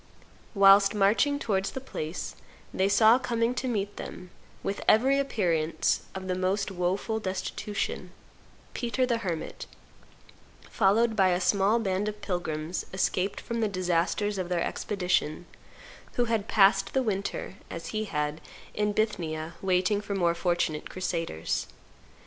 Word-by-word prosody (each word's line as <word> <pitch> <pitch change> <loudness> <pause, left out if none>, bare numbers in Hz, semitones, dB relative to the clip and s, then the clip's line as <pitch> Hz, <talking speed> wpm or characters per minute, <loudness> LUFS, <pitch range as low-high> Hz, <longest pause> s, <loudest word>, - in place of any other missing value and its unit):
Whilst 195 +1 +7
marching 210 +8 +3
towards 195 -8 0
the - - -5
place 170 -10 -5 0.4
they 190 +1 +2
saw 220 +4 +6
coming 235 -1 0
to 255 +1 -3
meet 205 -4 -2
then, 180 0 -8 0.3
with 200 - -3
every 265 +6 +5
appearance 170 - 0
of 190 0 -5
the 185 - 0
most 185 +2 0
woful 190 +5 -1
destitution, 190 -1 -3 0.6
Peter 250 +1 0
the 235 -2 0
Hermit, 175 -7 -4 1.0
followed 220 +3 +3
by 190 -2 +4
a 180 -1 +2
small 200 +4 +3
band 200 -2 -1
of 210 0 -8
pilgrims 175 -3 -3
escaped 190 0 0
from 235 0 -4
the 220 - +2
disasters 185 +2 0
of 180 -1 -3
their 175 -2 +1
expedition, 180 -5 -1 0.7
who 245 - +1
had 225 -3 -1
passed 195 -1 +4
the 265 - +2
winter, 200 -3 -3
as 165 0 -6
he 215 0 -2
had, 150 -4 -2 0.3
in 210 0 0
Bithynia, 165 -7 -2
waiting 190 +2 +2
for 200 -1 -4
more 175 -3 +2
fortunate 170 -3 -1
crusaders. 165 - -2
195 Hz, 135 wpm, -28 LUFS, 180-215 Hz, 1.0 s, Whilst